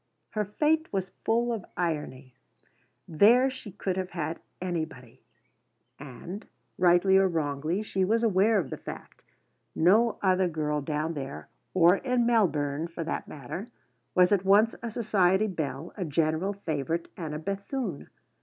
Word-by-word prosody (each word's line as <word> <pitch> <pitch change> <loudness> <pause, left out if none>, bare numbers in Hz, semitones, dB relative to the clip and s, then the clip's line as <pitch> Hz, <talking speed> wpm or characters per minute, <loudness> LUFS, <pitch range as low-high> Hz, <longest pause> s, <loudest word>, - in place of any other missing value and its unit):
Her 215 -1 -1
fate 310 +9 +1
was 190 -2 -2
full 235 +1 +1
of 220 -5 -4
irony. 150 -7 -3 0.7
There 235 +11 +5
she 260 -5 -9
could 190 -1 -3
have 185 -1 -2
had 165 -2 -4 0.2
anybody, 160 -9 -5 0.8
and, 145 - -8 0.3
rightly 180 +2 +5
or 195 0 +5
wrongly, 160 +3 -1
she 190 -3 -1
was 225 +5 +2
aware 215 0 +4
of 160 -10 -2
the - - -4
fact. - - -10 0.5
No 215 +8 +4
other 185 -1 +3
girl 150 -3 -1
down 155 +3 -2
there 140 -2 -6 0.3
or 180 +1 +6
in 250 -1 +1
Melbourne, 155 -9 +1
for 165 0 -5
that 160 - -4
matter 155 - -7 0.5
was 180 +1 +5
at 200 -2 +3
once 205 +4 +5
a 235 - -4
society 205 -3 +2
belle, 160 -5 -4
a 195 - -3
general 160 +4 0
favourite, 165 -3 -3
and 155 -4 -5
a - - -2
Bethune. 200 - -4
180 Hz, 145 wpm, -28 LUFS, 155-205 Hz, 0.8 s, or